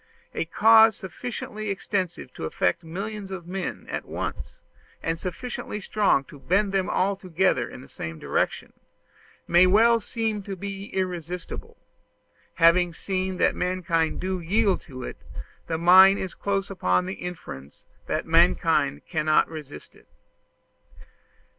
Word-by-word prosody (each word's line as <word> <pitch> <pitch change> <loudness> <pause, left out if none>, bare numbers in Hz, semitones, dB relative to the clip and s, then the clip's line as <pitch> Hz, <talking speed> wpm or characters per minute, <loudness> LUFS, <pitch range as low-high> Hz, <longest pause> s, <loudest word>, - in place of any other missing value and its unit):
A - - -2
cause 220 +4 +6
sufficiently 215 +2 -6
extensive 190 -7 -3
to - - -6
affect 90 - 0
millions 195 +4 -6
of 190 -3 -6
men 185 +1 -5
at - - -4
once, - - -6 0.4
and 165 0 -1
sufficiently 210 +3 -5
strong 200 -8 +2
to 140 +1 -14
bend 195 +7 +1
them 195 -1 0
all 195 +2 +1
together 185 -1 0
in - - -10
the - - -13
same 80 +3 -7
direction, - - -2 0.7
may 175 +2 +6
well 230 +5 +5
seem 220 -1 -3
irresistible: 190 -3 -5 0.8
having 170 +1 +4
seen 185 0 -2
that - - +3
mankind 180 -3 -1
do 185 0 -2
yield 195 +3 +1
to 130 -4 -9
it, - - -7 0.5
the 160 - -1
mind 190 +3 +7
is 190 -2 -4
close 195 -1 -2
upon 90 - +1
the 95 - -4
inference 70 - -8 0.2
that - - -1
mankind 70 - +3
cannot 155 -1 +2
resist 150 - -10
it. - - -22
185 Hz, 130 wpm, -25 LUFS, 165-200 Hz, 0.8 s, mind